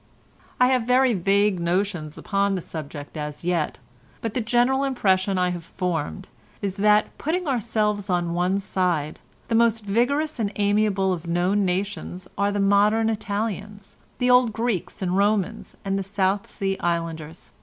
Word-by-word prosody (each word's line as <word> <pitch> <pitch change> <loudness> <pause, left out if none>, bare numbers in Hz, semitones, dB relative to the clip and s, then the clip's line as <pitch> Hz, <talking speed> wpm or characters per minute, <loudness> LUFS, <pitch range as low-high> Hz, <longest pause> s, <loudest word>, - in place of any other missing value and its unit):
"I 250 0 +5
have 255 -3 +2
very 255 0 +4
vague 200 0 +2
notions 175 -3 -1
upon 200 -1 0
the 185 - -3
subject 145 -2 -7
as 150 0 -5
yet, 170 -3 0 0.4
but 225 -2 -4
the 250 - 0
general 245 +4 +2
impression 195 -7 +1
I 180 0 +2
have 175 -1 -4
formed 165 - -3 0.3
is 195 -1 -3
that, 210 +1 +3
putting 340 +3 -1
ourselves 215 -5 0
on 175 -2 0
one 180 +3 +1
side, 175 -6 -1 0.3
the - - -2
most 225 -1 +3
vigorous 275 +8 +1
and 205 -3 0
amiable 205 -2 +2
of 170 -1 -6
known 180 +4 +1
nations 185 -1 -3
are 200 +1 +1
the 205 - -1
modern 210 +3 +3
Italians, 205 -1 -4 0.2
the 250 0 +2
old 250 -3 +5
Greeks 205 -6 -2
and 180 0 0
Romans, 205 +1 0
and 195 0 0
the - - -2
South 195 0 0
Sea 195 -1 -2
Islanders. 165 -1 -3
200 Hz, 155 wpm, -24 LUFS, 180-220 Hz, 0.4 s, I